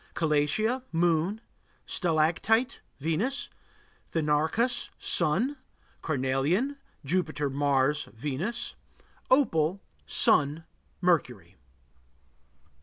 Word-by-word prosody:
Calatia 165 - +1
Moon. 170 +5 +1 0.4
Stalactite 175 +8 +1 0.2
Venus. 170 - -1 0.6
Thenarcus 160 +11 +1
Sun. 195 - +1 0.4
Carnelian 155 - 0 0.3
Jupiter, 155 -3 -1
Mars, 140 +1 +1
Venus. 145 - -4 0.6
Opal 185 - +3 0.3
Sun, 150 +3 +3 0.4
Mercury. 125 - 0
160 Hz, 60 wpm, -28 LUFS, 145-215 Hz, 0.6 s, Opal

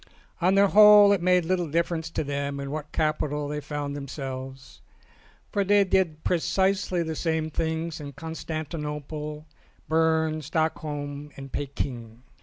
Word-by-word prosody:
On 185 +3 +3
the 200 0 +5
whole 210 0 +8
it 195 - 0
made 180 -1 +3
little 175 -2 0
difference 165 +1 -1
to 160 - -2
them 140 0 -3
in 140 0 -5
what 150 0 -5
capital 150 -1 -1
they 150 +1 -3
found 145 0 -4
themselves, 135 -2 -7 0.7
for 200 - +1
they 200 +1 +4
did 180 -5 0
pre 175 - +1
cisely 190 0 +1
the 160 -1 -4
same 160 -1 -1
things 160 +1 -2
in 145 -1 -8
Constantinople, 150 -1 -5 0.4
Berne, 160 -1 +2
Stockholm 150 -2 -3
and 135 -1 -9
Peking. 125 -4 -5
155 Hz, 140 wpm, -26 LUFS, 145-170 Hz, 0.7 s, whole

